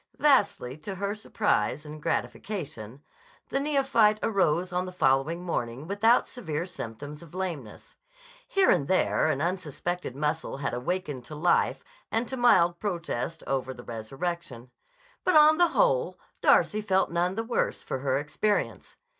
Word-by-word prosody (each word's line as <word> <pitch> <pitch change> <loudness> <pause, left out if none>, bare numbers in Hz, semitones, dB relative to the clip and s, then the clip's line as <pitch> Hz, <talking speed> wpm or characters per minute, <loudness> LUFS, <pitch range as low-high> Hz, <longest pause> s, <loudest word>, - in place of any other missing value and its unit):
Vastly 205 - +2
to 195 +5 -6
her 200 +2 -2
surprise 155 - 0
and 150 0 -9
gratification, 145 - -4 0.5
the 275 - 0
neophyte 270 -7 +3
arose 185 -3 +1
on 180 +1 -1
the - - -6
following 155 +1 +1
morning 130 -5 -3
without 210 +6 +3
severe 170 - -4
symptoms 145 -1 -8
of 170 0 -13
lameness. 165 - -6 0.5
Here 390 -1 +4
and 140 - +2
there 185 -3 +2
an 140 -1 0
unsuspected 175 -3 -3
muscle 150 +1 -2
had 135 -3 -3
awakened 140 0 -3
to 150 - -8
life 170 +4 +2 0.3
and 230 +2 0
to 265 - -3
mild 175 -9 +4
protest 170 - -3
over 130 -1 -2
the 120 - -11
resurrection. 125 +2 -5 0.5
But 365 - +2
on 310 +1 +7
the 350 - +6
whole - - +2 0.2
Darcy 215 0 +4
felt 190 -4 +1
none 175 +2 0
the 225 - -1
worse 235 +1 -1
for 130 - -3
her 135 0 0
experience. 155 +9 -2
175 Hz, 145 wpm, -27 LUFS, 140-210 Hz, 0.5 s, on